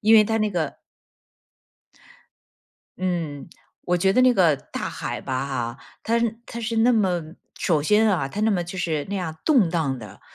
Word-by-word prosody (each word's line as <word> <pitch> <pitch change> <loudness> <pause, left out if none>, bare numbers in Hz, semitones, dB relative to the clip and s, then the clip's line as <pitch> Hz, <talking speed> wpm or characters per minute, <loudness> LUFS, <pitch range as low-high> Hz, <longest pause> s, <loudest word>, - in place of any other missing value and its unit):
因 220 +1 +5
为 215 - +9
它 225 +1 0
那 215 0 +1
个 165 -6 -2 2.3
嗯， 170 -6 -3 0.3
我 180 0 +1
觉 190 +2 +2
得 255 - +4
那 255 -1 +5
个 170 -7 +4
大 - - -6
海 - - -5
吧 130 +1 -3
哈， 120 -3 -3 0.2
它 225 - 0 0.3
它 235 - -6
是 230 0 -1
那 245 +2 +5
么 185 -6 +1 0.3
首 160 -4 +1
先 210 +8 +3
啊， 165 -8 +1
它 205 - -5
那 220 - +3
么 180 -4 0
就 185 +2 -8
是 155 -5 -1
那 200 - -3
样 170 -5 -3
动 245 - +4
荡 155 -6 0
的， 105 -3 -11
180 Hz, 190 characters per minute, -24 LUFS, 155-215 Hz, 2.3 s, 为